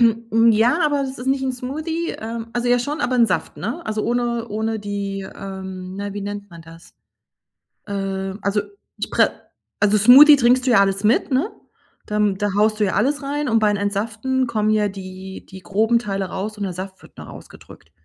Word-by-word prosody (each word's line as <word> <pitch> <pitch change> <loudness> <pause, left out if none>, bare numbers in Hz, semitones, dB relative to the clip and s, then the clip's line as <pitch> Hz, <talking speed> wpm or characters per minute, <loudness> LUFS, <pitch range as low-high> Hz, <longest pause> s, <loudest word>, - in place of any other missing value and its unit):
Hm, 230 0 +3
ja, 230 +7 +3
aber 290 -2 +1
das 265 -1 -5
ist 250 - -7
nicht 270 0 +1
'n 265 -1 -1
Smoothie. 315 +7 -4
Ähm, 225 +1 -5
also 245 0 -1
ja, 245 - +4
schon, 290 +5 -3
aber 255 -2 0
'n 235 -1 +5
Saft, - - -2
ne? 340 - -4
Also 215 0 -2
ohne 235 -1 -1
ohne 220 +1 -2
die, 200 -1 -4
ähm, 190 -1 -7
na 200 0 -4
wie 205 - -4
nennt 205 0 -6
man 170 -1 -12
das? 165 +1 -15 0.9
Ähm, 195 -1 -4
also 200 +1 +1 0.4
ich - - -4
pre - - +3 0.5
also 210 0 +4
Smoothie 275 +8 +9
trinkst 255 +1 +3
du 255 - +3
ja 210 -4 +6
alles 195 0 +1
mit, 220 +5 +2
ne? 270 +11 +1 0.6
Dann 210 -2 +1
da 205 +1 -1
haust 215 +1 +2
du 210 - +2
ja 190 - 0
alles 280 +7 +1
rein 290 +1 -2
und 225 0 +3
beim 210 -1 +2
Entsaften 220 +6 -1
kommen 215 -2 -1
ja 210 -1 +2
die 190 -1 -9
die 190 0 -11
groben 220 +6 +1
Teile 195 -3 -3
raus 205 +3 -5
und 205 - -2
der 185 -3 -4
Saft 190 +1 -7
wird - - -18
nur - - -10
ausgedrückt. - - -14
215 Hz, 205 wpm, -21 LUFS, 200-245 Hz, 0.9 s, Smoothie